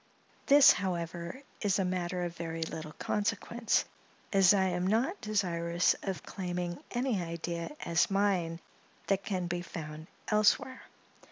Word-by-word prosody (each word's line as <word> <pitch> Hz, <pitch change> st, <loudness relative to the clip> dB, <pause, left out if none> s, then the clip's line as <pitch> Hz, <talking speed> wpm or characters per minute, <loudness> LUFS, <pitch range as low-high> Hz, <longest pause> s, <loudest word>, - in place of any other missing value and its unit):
This, 285 Hz, -1 st, +9 dB
however, 175 Hz, +5 st, -3 dB, 0.2 s
is 200 Hz, -3 st, +2 dB
a 190 Hz, -, +1 dB
matter 180 Hz, 0 st, -2 dB
of 170 Hz, -1 st, -4 dB
very 165 Hz, -1 st, -3 dB
little 155 Hz, -1 st, -6 dB
consequence, 220 Hz, +2 st, 0 dB, 0.5 s
as 195 Hz, -2 st, +6 dB
I 200 Hz, -2 st, +4 dB
am 180 Hz, -1 st, 0 dB
not 245 Hz, -, +1 dB
desirous 175 Hz, -5 st, +1 dB
of 190 Hz, -3 st, -4 dB
claiming 175 Hz, -2 st, -4 dB
any 240 Hz, -5 st, 0 dB
idea 170 Hz, -, -4 dB
as 170 Hz, -1 st, +2 dB
mine 190 Hz, -4 st, +1 dB, 0.5 s
that 195 Hz, 0 st, +1 dB
can 185 Hz, -3 st, -2 dB
be 175 Hz, 0 st, -2 dB
found 155 Hz, -2 st, -7 dB, 0.2 s
elsewhere. 215 Hz, +5 st, +2 dB
180 Hz, 135 wpm, -31 LUFS, 170-205 Hz, 0.5 s, This